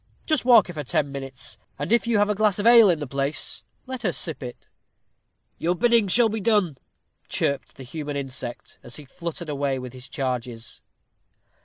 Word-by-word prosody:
Just 310 -6 +1
walk 235 -5 +7
her 175 - -8
for 150 -2 -4
ten 140 +2 0
minutes, 135 -2 -8 0.2
and 145 +7 -4
if 235 0 +3
you 235 -2 +2
have 205 0 +3
a 210 - +1
glass 210 -2 +2
of 205 - -2
ale 230 -3 +8
in 170 - +3
the 150 - -4
place, 140 +2 -1 0.2
let 260 -1 -6
her 195 - +1
sip 160 -4 -2
it." 125 -2 -9 0.9
"Your 175 +2 +1
bidding 235 0 +3
shall 230 +5 +5
be 220 0 -3
done," 195 - +1 0.5
chirped 140 -1 -2
the 135 - -10
human 145 +2 -5
insect, 135 -3 -6
as 120 - -9
he 150 - -9
fluttered 170 +4 -6
away 140 -2 -1
with 125 -1 -7
his 130 +1 -11
charges. 125 -3 -4
155 Hz, 190 wpm, -24 LUFS, 135-210 Hz, 0.9 s, ale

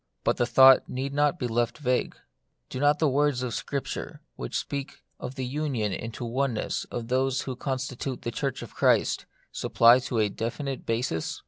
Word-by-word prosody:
But - - +1
the 120 - +1
thought 130 +2 +7
need 135 +2 -3
not 145 0 +2
be - - -3
left 120 0 0
vague. 125 -4 0 0.6
Do 130 - -4
not 145 +1 +4
the 155 - +2
words 140 -2 +1
of 125 -2 -3
Scripture, 140 -2 -4 0.2
which - - -4
speak 140 -1 -5 0.2
of 130 - -6
the 130 -2 -3
union 125 -7 -1
into 115 +4 -5
oneness 125 -1 -1
of 120 -1 -6
those 130 +1 +1
who 130 - -5
constitute 130 0 -4
the 120 - -2
Church 135 +1 -3
of - - -11
Christ, - - +2 0.2
supply 120 +2 +5
to 125 -1 -3
it 110 - +4
a - - -1
definite 130 +6 -4
basis 115 -8 -1
130 Hz, 185 wpm, -27 LUFS, 120-140 Hz, 0.6 s, thought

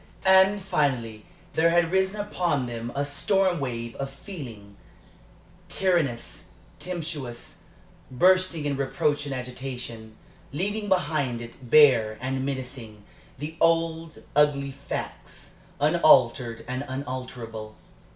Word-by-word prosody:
And, 190 +2 +6
finally, 135 - -1 0.3
there 165 +1 +4
had 170 0 +3
risen 190 +2 +1
upon 175 -9 0
them 120 0 -5
a 140 +1 0
storm 185 +5 +1
wave 120 -3 -4
of 135 0 -3
feeling 125 - -10 0.9
tyrannous, 170 -11 -1 0.3
tempestuous 155 -9 -6 0.5
bursting 180 +3 +3
in 140 -2 -1
reproach 145 +2 0
and 135 - -3
agitation, 125 -3 -7 0.4
leaving 205 +7 -2
behind 145 -9 +1
it, 120 +1 -10
bare 120 -7 +6
and 130 +1 -2
menacing, 125 -6 -6 0.3
the 150 +4 -6
old, 165 -1 +1
ugly 145 -2 +3
facts, 140 +1 -7 0.3
unaltered 130 -7 +4
and 130 +2 -3
unalterable. 125 -5 -6
140 Hz, 105 wpm, -26 LUFS, 125-165 Hz, 0.9 s, And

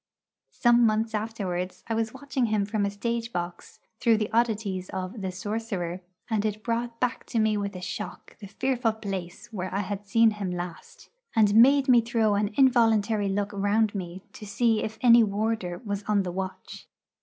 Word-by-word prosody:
Some 240 0 +4
months 220 +1 0
afterwards 195 -5 -3
I 230 - -2
was 225 0 -1
watching 265 -1 -2
him 210 -2 +1
from 205 -1 0
a - - -1
stage 230 +3 -3
box 175 -2 -5 0.2
through 230 -2 +4
the 215 -1 -2
oddities 210 -5 0
of 190 +3 -5
the 190 -1 -3
'Sorcerer,' 185 -2 -4 0.3
and 220 -3 0
it 215 0 -2
brought 235 0 -2
back 250 -1 -1
to 240 - -3
me 220 -1 +3
with 200 -1 -3
a 180 - -6
shock 210 +3 -7
the 200 - -9
fearful 245 +2 0
place 200 +1 -6
where 185 -2 -4
I 200 - -1
had 205 +1 -5
seen 225 +2 +5
him 205 -3 -4
last, 180 - -7 0.3
and 210 -2 +4
made 270 +5 +6
me 245 -2 +6
throw 225 -2 +1
an 205 +1 0
involuntary 225 -5 +3
look 200 +1 -1
round 205 +2 +1
me 185 -1 -6
to - - -11
see 220 +2 +1
if 220 0 -4
any 235 -1 +7
warder 205 -3 -1
was 200 -1 -2
on 205 -2 +2
the 180 - -4
watch. 190 +1 -6
215 Hz, 185 wpm, -27 LUFS, 195-230 Hz, 0.3 s, any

